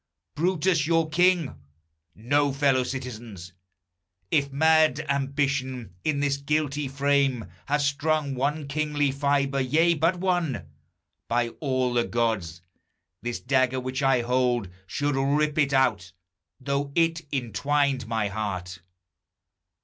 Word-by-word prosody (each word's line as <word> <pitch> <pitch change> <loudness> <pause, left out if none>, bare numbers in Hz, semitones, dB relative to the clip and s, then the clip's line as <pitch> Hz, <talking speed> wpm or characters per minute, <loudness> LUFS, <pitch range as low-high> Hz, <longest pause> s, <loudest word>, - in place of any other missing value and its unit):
Brutus 170 -1 +1
your 165 -1 +2
king! 175 -2 +2 0.6
No, 145 +6 +1
fellow 135 -1 +2
citizens! 115 -8 -7 0.8
If 140 -2 +2
mad 155 0 +3
ambition 135 - -1
in 145 -2 0
this 140 -1 +1
guilty 145 0 -1
frame 140 -3 +1 0.2
Had 145 +1 +1
strung 145 0 0
one 140 +3 -1
kingly 145 -1 0
fibre, 140 0 0
yea, 160 +6 +3
but 165 +3 +1
one, 175 - -1 0.6
By 120 0 +1
all 130 -4 0
the 120 -1 +2
gods, 110 -8 -1 0.6
this 120 +1 -3
dagger 130 0 +1
which 130 +2 -4
I 135 -2 +3
hold 120 -3 0 0.2
Should 145 +8 -1
rip 145 +3 +1
it 140 -2 +2
out, 115 -9 +1 0.5
though 140 +1 -2
it 165 -1 +2
intwined 135 +1 0
my 110 -2 0
heart. 95 -3 -4
140 Hz, 120 wpm, -26 LUFS, 125-150 Hz, 0.8 s, mad